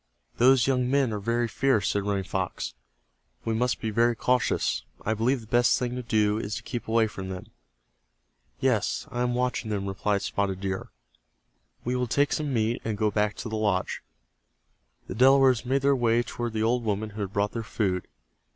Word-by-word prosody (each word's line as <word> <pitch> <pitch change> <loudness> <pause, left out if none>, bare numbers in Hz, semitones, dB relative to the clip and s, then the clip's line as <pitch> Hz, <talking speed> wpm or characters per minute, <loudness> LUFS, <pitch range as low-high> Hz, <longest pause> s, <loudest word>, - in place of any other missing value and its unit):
"Those 130 0 +5
young 125 -2 +1
men 135 -4 +2
are 105 - -2
very 115 +3 0
fierce," 115 -5 +1
said 100 - 0
Running 100 -1 -1
Fox. 95 -9 -3 0.7
"We 115 - 0
must 125 +3 0
be 110 - -2
very 115 +2 +3
cautious. 110 - +1 0.2
I 110 - +1
believe 120 +4 +1
the - - -12
best 120 +1 +3
thing 125 -1 -2
to 125 - -3
do 105 -2 +1
is 105 0 -3
to 115 - -6
keep 120 +2 -5
away 115 0 +3
from 95 -3 -6
them." 90 -1 -7 1.1
"Yes, - - +1
I 120 - -2
am 125 0 0
watching 125 -2 -1
them," 100 -2 -2
replied 100 +1 -1
Spotted 95 -2 -1
Deer. 95 -1 -3 1.0
"We 125 +1 0
will 125 0 0
take 145 +5 +2
some 150 -2 -1
meat, 115 -1 0
and 110 -2 -2
go 105 0 +1
back 105 0 0
to - - -6
the 110 - -4
lodge." 100 -4 0 1.0
The - - -6
Delawares 130 -1 +5
made 135 +1 +1
their 140 0 +4
way 120 -1 +2
toward 120 -1 -4
the 110 0 0
old 120 +2 +1
woman 105 0 -2
who 105 +1 -6
had 100 -2 -3
brought 100 +1 0
their 115 - -3
food. 95 -5 -2
115 Hz, 195 wpm, -27 LUFS, 105-125 Hz, 1.1 s, Those